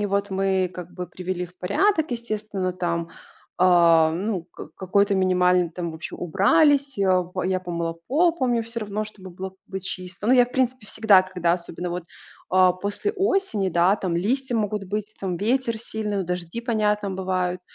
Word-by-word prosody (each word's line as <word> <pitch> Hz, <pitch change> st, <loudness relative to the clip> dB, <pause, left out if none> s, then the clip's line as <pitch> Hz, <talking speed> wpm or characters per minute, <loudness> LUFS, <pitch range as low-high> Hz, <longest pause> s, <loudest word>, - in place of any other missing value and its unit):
И 205 Hz, -, 0 dB
вот 200 Hz, +1 st, -1 dB
мы 190 Hz, -1 st, +1 dB
как 180 Hz, -1 st, -8 dB
бы 180 Hz, 0 st, -6 dB
привели 180 Hz, 0 st, -4 dB
в 180 Hz, +1 st, -23 dB
порядок, 315 Hz, -, +1 dB
естественно. 215 Hz, -5 st, -3 dB
Там, 170 Hz, -2 st, -2 dB, 0.5 s
а, 170 Hz, -3 st, +5 dB
ну, 185 Hz, +1 st, -2 dB
как 155 Hz, -, -11 dB
какой-то 200 Hz, +2 st, +1 dB
минимальный, 180 Hz, -2 st, +3 dB
там 170 Hz, -1 st, -5 dB
вообще 160 Hz, +1 st, -7 dB
убрались. 275 Hz, -, +3 dB
Э, 200 Hz, -, +2 dB, 0.3 s
о, -, -, -2 dB
я 185 Hz, 0 st, 0 dB
помыла 170 Hz, -2 st, -3 dB
пол, 330 Hz, +7 st, +3 dB
помню, 245 Hz, -7 st, +1 dB
всё 230 Hz, +1 st, -6 dB
равно, 210 Hz, 0 st, -3 dB
чтобы 200 Hz, -3 st, -10 dB
было 190 Hz, +2 st, -6 dB
как 190 Hz, -, -29 dB
бы 190 Hz, -, -5 dB
чисто. 185 Hz, +1 st, -6 dB
Ну, 245 Hz, -, +5 dB
я, 250 Hz, -1 st, +7 dB
в 250 Hz, -, -16 dB
принципе, 255 Hz, -3 st, 0 dB
всегда, 205 Hz, -3 st, +5 dB
когда 180 Hz, -2 st, 0 dB
особенно 175 Hz, 0 st, -4 dB
вот, 175 Hz, 0 st, -4 dB, 0.5 s
а, 185 Hz, 0 st, +5 dB
после 200 Hz, -, -3 dB
осени, 390 Hz, -, 0 dB
да, 175 Hz, +2 st, +3 dB
там 180 Hz, -5 st, -2 dB
листья 245 Hz, +7 st, 0 dB
могут 210 Hz, -1 st, -1 dB
быть, 210 Hz, +2 st, -4 dB
там 185 Hz, -2 st, -2 dB
ветер 230 Hz, +3 st, 0 dB
сильный, 215 Hz, -2 st, -3 dB
вот 190 Hz, -, -2 dB
дожди, 180 Hz, +4 st, -4 dB
понятно, 210 Hz, -4 st, 0 dB
бывают. 185 Hz, -1 st, -2 dB
190 Hz, 185 wpm, -24 LUFS, 180-220 Hz, 0.5 s, я